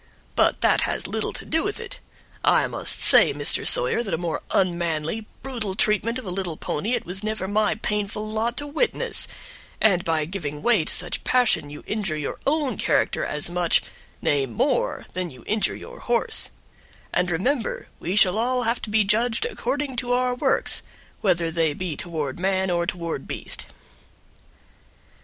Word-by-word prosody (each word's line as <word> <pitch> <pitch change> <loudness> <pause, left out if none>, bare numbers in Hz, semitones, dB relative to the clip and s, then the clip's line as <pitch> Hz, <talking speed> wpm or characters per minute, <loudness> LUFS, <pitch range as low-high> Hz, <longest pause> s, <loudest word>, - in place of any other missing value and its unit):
But - - +2
that - - +3
has - - -1
little - - -2
to - - -6
do 320 - +1
with 405 +2 -3
it. 465 - -6 0.4
I - - +4
must - - 0
say, - - +7
Mr. - - +4
Sawyer, - - +7
that 210 -5 -2
a - - -4
more 170 -1 -3
unmanly, 175 +2 -1 0.2
brutal 230 -8 -3
treatment 215 +3 +1
of 255 - -8
a 185 - -5
little 180 -4 -3
pony 210 +11 -3
it 235 - -4
was 185 +3 -4
never 215 -3 -3
my 215 +1 +1
painful 210 0 -3
lot 220 +2 -2
to 290 - -2
witness, 320 +11 +3 0.5
and 185 -5 +3
by 160 -2 0
giving 150 -4 -6
way 220 -10 +3
to - - 0
such 175 - +2
passion 245 -12 +2
you 150 - -10
injure 195 -8 -2
your 150 - -5
own 290 -2 0
character - - +1
as 150 - -2
much, 175 -1 +2 0.4
nay 140 -2 +1
more, 115 - -1
than 185 -1 -3
you 130 -4 -15
injure 210 -2 +1
your - - -11
horse; 240 -1 +1 0.6
and 180 0 +1
remember, 225 - -1
we 180 - -3
shall 195 0 +7
all 250 +2 0
have 235 +1 -1
to 215 - -4
be 215 0 +3
judged 225 - +1
according 290 - -3
to 245 0 -1
our 250 0 +1
works, 245 - +1 0.4
whether 170 -4 +1
they 160 -3 0
be 180 -3 -4
toward 155 -4 -4
man 190 0 0
or 170 0 0
toward 170 -2 -4
beast." - - -2
200 Hz, 175 wpm, -23 LUFS, 170-235 Hz, 0.6 s, say